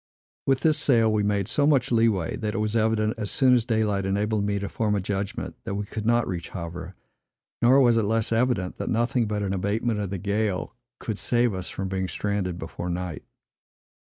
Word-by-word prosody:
With 135 -1 +2
this 155 -2 +3
sail, 115 -5 +3
we 105 - +2
made 100 -1 0
so 145 +5 +2
much 135 -4 +2
lee 115 -1 +4
way, 95 -7 -2
that 110 -2 -3
it - - -1
was 105 +1 -1
evident, 110 -1 +2
as 105 -3 -2
soon 130 -2 +4
as 120 -3 +3
daylight 110 -4 +1
enabled 105 +2 0
me 100 0 0
to 100 0 -3
form 105 0 0
a - - +1
judgment, 100 +1 -3
that 100 - -4
we 105 0 -3
could 110 +1 -5
not 120 0 +3
reach 85 -3 -4
Havre; 85 +1 -7 0.7
nor 130 +3 +6
was 120 -3 +5
it - - +3
less 110 +1 +1
evident, 115 -5 0
that - - -3
nothing 120 0 +1
but 105 -1 -2
an 95 -1 -1
abatement 105 +4 -1
of 100 -2 -2
the 100 - -3
gale 100 +1 -1 0.2
could 110 -3 -4
save 120 -2 +2
us 95 -1 -5
from 95 - -4
being 95 0 -2
stranded 100 -3 -2
before 85 +1 -5
night. 90 -1 -4
105 Hz, 210 wpm, -25 LUFS, 95-115 Hz, 0.7 s, nor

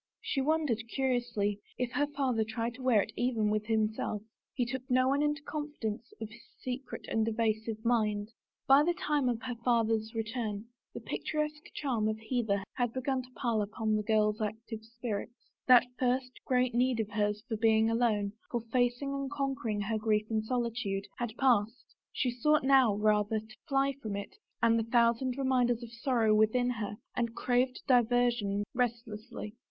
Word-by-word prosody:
She 270 - -1
wondered, 295 -5 +1
curiously, 240 -6 0 0.2
if 250 -1 -1
her 290 +3 +1
father 265 -6 0
tried 230 +2 -3
to 255 - -11
wear 240 -6 +4
it - - -9
even 225 -4 +1
with 215 0 -1
him 220 -1 +3
self. 210 -1 -3 0.3
He 245 - -1
took 260 +2 -3
no 255 0 +4
one 280 +2 +2
into 295 -1 0
the - - -34
confidence 250 -7 -4
of 220 - -4
his 225 +2 -15 0.2
secret 255 +1 -5
and 220 0 +1
evasive 220 0 -1
mind. 215 -3 +1 0.4
By 275 +1 +7
the 345 +3 +1
time 295 -5 +1
of 240 0 -2
her 255 -1 -3
father's 225 -2 +1
return 220 -2 -3 0.3
the - - -5
picturesque 300 0 -3
charm 240 -7 0
of 215 0 -1
Hever 220 -4 -1
had 245 -2 -1
begun 260 0 -1
to 250 - -14
pall 230 -4 0
upon 215 +1 -1
the 215 - +1
girl's 210 0 +2
active 220 +1 -4
spirits. 230 0 -5 0.3
That 250 -2 +8
first 255 0 +1
great 250 -1 +2
need 250 0 +2
of 215 -2 -2
hers 210 0 0
for 230 - -2
being 220 0 +4
alone, 225 -3 +1 0.2
for 240 - -1
facing 245 +3 +1
and 275 -1 -3
conquering 270 -7 -2
her 215 +2 -1
grief 215 -1 +1
in 220 -1 +1
solitude, 225 -4 -2
had 235 -2 -4
passed. 235 -2 +1 0.2
She 250 - 0
sought 300 +5 +2
now, 265 -6 +5
rather, 210 +1 +2
to 220 0 -14
fly 275 -1 +2
from 210 -2 -4
it 200 0 -6 0.3
and 230 0 +5
the - - 0
thousand 235 +2 +2
reminders 250 -3 +2
of 230 - -9
sorrow 235 -3 +2
within 220 +4 +3
her 210 -3 -4 0.2
and 235 -1 -1
craved 250 +1 0
diversion 240 -5 +3
restlessly. 230 -3 -3
235 Hz, 175 wpm, -31 LUFS, 215-255 Hz, 0.4 s, That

